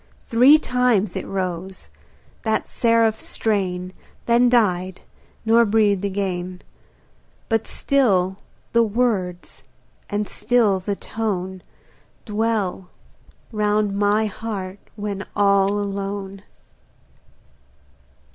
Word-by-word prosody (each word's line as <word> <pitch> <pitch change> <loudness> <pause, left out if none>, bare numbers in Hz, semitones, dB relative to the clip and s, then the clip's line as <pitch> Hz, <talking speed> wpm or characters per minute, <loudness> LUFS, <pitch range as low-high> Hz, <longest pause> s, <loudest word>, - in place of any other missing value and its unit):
Three 255 +6 +6
times 250 - +1
it - - -4
rose, 185 0 -4 0.5
that 220 -1 0
seraph 230 -2 +2
strain, 185 -4 -1 0.3
Then 240 +1 +4
died, 190 -6 +1 0.4
nor 230 +1 +5
breathed 205 -3 +2
again; 185 -2 -3 0.9
But 225 -1 0
still 195 -9 +2 0.4
the 235 - +5
words 210 -6 -1 0.5
and 205 0 -1
still 225 -6 +2
the 200 +2 -3
tone 190 -4 -4 0.6
Dwell 210 -4 -1 0.6
round 210 -1 +1
my 205 +2 +2
heart 200 -2 -5 0.2
when 205 -2 -4
all 200 -1 +4
alone. 200 -1 -4
205 Hz, 90 wpm, -22 LUFS, 190-225 Hz, 0.9 s, Three